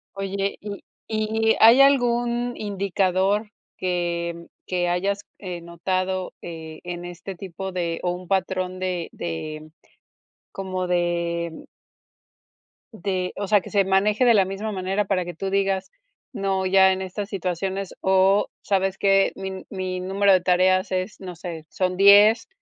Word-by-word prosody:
Oye, 195 Hz, 0 st, -2 dB
y 205 Hz, -1 st, -7 dB, 0.3 s
y, 220 Hz, +1 st, +1 dB
¿hay 230 Hz, +4 st, +8 dB
algún 245 Hz, -3 st, +2 dB
indicador 200 Hz, +1 st, 0 dB, 0.3 s
que 170 Hz, -2 st, -2 dB, 0.2 s
que 180 Hz, -1 st, 0 dB
hayas, 195 Hz, +3 st, 0 dB, 0.2 s
eh, 180 Hz, -3 st, -6 dB
notado?, 185 Hz, +2 st, -2 dB
eh, 160 Hz, -2 st, -8 dB
en 175 Hz, 0 st, -6 dB
este 175 Hz, +2 st, -7 dB
tipo 190 Hz, +1 st, -6 dB
de, 170 Hz, -2 st, -2 dB
¿o 180 Hz, -, +1 dB
un 180 Hz, 0 st, -7 dB
patrón?, 185 Hz, -1 st, -1 dB
de 180 Hz, -2 st, -2 dB
de 155 Hz, -, -5 dB, 0.8 s
como 185 Hz, -1 st, -3 dB
de 170 Hz, -1 st, -1 dB, 1.2 s
De, 185 Hz, -3 st, -3 dB
o 200 Hz, -, -3 dB
sea, 205 Hz, 0 st, +4 dB
que -, -, -10 dB
se 200 Hz, -2 st, +2 dB
maneje 205 Hz, +5 st, +2 dB
de 240 Hz, -, +6 dB
la 200 Hz, -3 st, +4 dB
misma 195 Hz, +3 st, -4 dB
manera 195 Hz, +1 st, -1 dB
para 190 Hz, -2 st, 0 dB
que 175 Hz, -1 st, -7 dB
tú 195 Hz, +4 st, -3 dB
digas: 195 Hz, -1 st, 0 dB, 0.4 s
"No 195 Hz, -1 st, -1 dB
ya 190 Hz, 0 st, +5 dB
en 190 Hz, 0 st, -2 dB
estas 200 Hz, +2 st, -5 dB
situaciones, 190 Hz, 0 st, -3 dB
o 190 Hz, +1 st, +3 dB, 0.2 s
sabes 195 Hz, -1 st, 0 dB
que, 195 Hz, 0 st, +3 dB
mi 190 Hz, -1 st, -6 dB
mi 185 Hz, -1 st, -3 dB
número 195 Hz, +2 st, +3 dB
de 185 Hz, -, +4 dB
tareas 185 Hz, +2 st, +3 dB
es, 185 Hz, +2 st, -2 dB
no 180 Hz, -2 st, -8 dB
sé, 165 Hz, -2 st, -7 dB
son 185 Hz, -1 st, -1 dB
10, 205 Hz, -, +7 dB
190 Hz, 145 wpm, -24 LUFS, 180-200 Hz, 1.2 s, hay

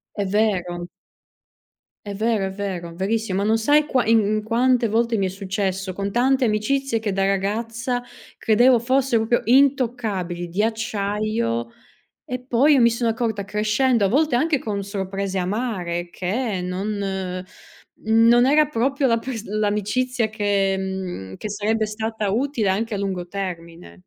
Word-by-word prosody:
È 205 Hz, -, -1 dB
vero. 180 Hz, -4 st, 0 dB, 1.2 s
È 200 Hz, -, -5 dB
vero, 215 Hz, -2 st, 0 dB
è -, -, -3 dB
vero, 185 Hz, -4 st, -5 dB
verissimo. 195 Hz, +1 st, -1 dB
Ma -, -, 0 dB
non 225 Hz, +1 st, +3 dB
sai 290 Hz, +6 st, +4 dB
qua 255 Hz, -6 st, 0 dB
in 225 Hz, 0 st, +5 dB, 0.2 s
in -, -, -4 dB
quante 240 Hz, +1 st, +2 dB
volte 230 Hz, +1 st, +1 dB
mi 195 Hz, -, +1 dB
è -, -, -1 dB
successo 190 Hz, 0 st, -3 dB
con 200 Hz, +1 st, -4 dB
tante 260 Hz, +2 st, +2 dB
amicizie 230 Hz, +3 st, 0 dB
che 210 Hz, -3 st, -2 dB
da 195 Hz, 0 st, 0 dB
ragazza 225 Hz, +5 st, -1 dB, 0.4 s
credevo 240 Hz, +3 st, +4 dB
fossero 245 Hz, -2 st, +1 dB
proprio 240 Hz, +1 st, +2 dB
intoccabili, 230 Hz, -10 st, +1 dB
di 190 Hz, +5 st, -1 dB
acciaio 215 Hz, -, -1 dB, 0.6 s
e 250 Hz, 0 st, -4 dB
poi 260 Hz, +4 st, +3 dB
io 265 Hz, -, +4 dB
mi 235 Hz, -, +6 dB
sono 235 Hz, 0 st, 0 dB
accorta 220 Hz, -3 st, -2 dB
crescendo, 215 Hz, +3 st, +1 dB
a -, -, +3 dB
volte 280 Hz, +2 st, +2 dB
anche 305 Hz, +2 st, +2 dB
con 200 Hz, -2 st, -3 dB
sorprese 195 Hz, -1 st, -3 dB
amare, 180 Hz, -4 st, -2 dB
che 200 Hz, +2 st, -2 dB
non 190 Hz, -1 st, -3 dB, 0.5 s
non 230 Hz, +2 st, +4 dB
era 300 Hz, +2 st, +4 dB
proprio 275 Hz, +1 st, 0 dB
la 230 Hz, -2 st, +3 dB
pers 230 Hz, -2 st, -6 dB
l'amicizia 215 Hz, +4 st, 0 dB
che 200 Hz, -2 st, 0 dB
mhmm, 185 Hz, -, -5 dB
che 215 Hz, -, -6 dB
sarebbe 215 Hz, +1 st, 0 dB
stata 220 Hz, -1 st, -3 dB
utile 235 Hz, -1 st, 0 dB
anche 215 Hz, +3 st, -1 dB
a -, -, -2 dB
lungo 190 Hz, -3 st, -3 dB
termine. 175 Hz, -3 st, -6 dB
215 Hz, 150 wpm, -22 LUFS, 195-235 Hz, 1.2 s, mi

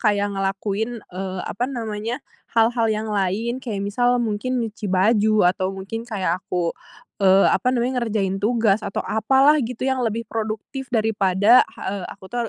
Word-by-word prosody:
kayak 205 Hz, -2 st, +1 dB
ngelakuin, 195 Hz, +4 st, -2 dB, 0.2 s
eee, 185 Hz, 0 st, -4 dB
apa 240 Hz, -, -2 dB
namanya, 230 Hz, +1 st, -4 dB, 0.3 s
hal-hal 230 Hz, 0 st, +3 dB
yang 220 Hz, 0 st, -1 dB
lain, 210 Hz, +6 st, -1 dB
kayak 210 Hz, -6 st, -4 dB
misal 245 Hz, +5 st, +2 dB
mungkin 240 Hz, +2 st, -1 dB
nyuci 215 Hz, -1 st, -6 dB
baju, 210 Hz, +3 st, +3 dB
atau 185 Hz, 0 st, -2 dB
mungkin 225 Hz, +5 st, -6 dB
kayak 185 Hz, -5 st, -1 dB
aku, 175 Hz, -3 st, -2 dB, 0.5 s
eee, 195 Hz, 0 st, +5 dB
apa 250 Hz, -, +1 dB
namanya, 250 Hz, 0 st, 0 dB
ngerjain 195 Hz, -4 st, -1 dB
tugas 220 Hz, -1 st, +2 dB
atau 195 Hz, -, -4 dB
apalah, 270 Hz, +7 st, +4 dB
gitu, 245 Hz, 0 st, -4 dB
yang 265 Hz, -1 st, 0 dB
lebih 230 Hz, -1 st, -1 dB
produktif. 220 Hz, +5 st, -5 dB
Daripada, 215 Hz, -1 st, +3 dB
ha -, -, -16 dB, 0.2 s
eee, -, -, -6 dB
aku 190 Hz, +1 st, -12 dB
tuh 240 Hz, -1 st, -1 dB
220 Hz, 160 wpm, -22 LUFS, 195-240 Hz, 0.5 s, eee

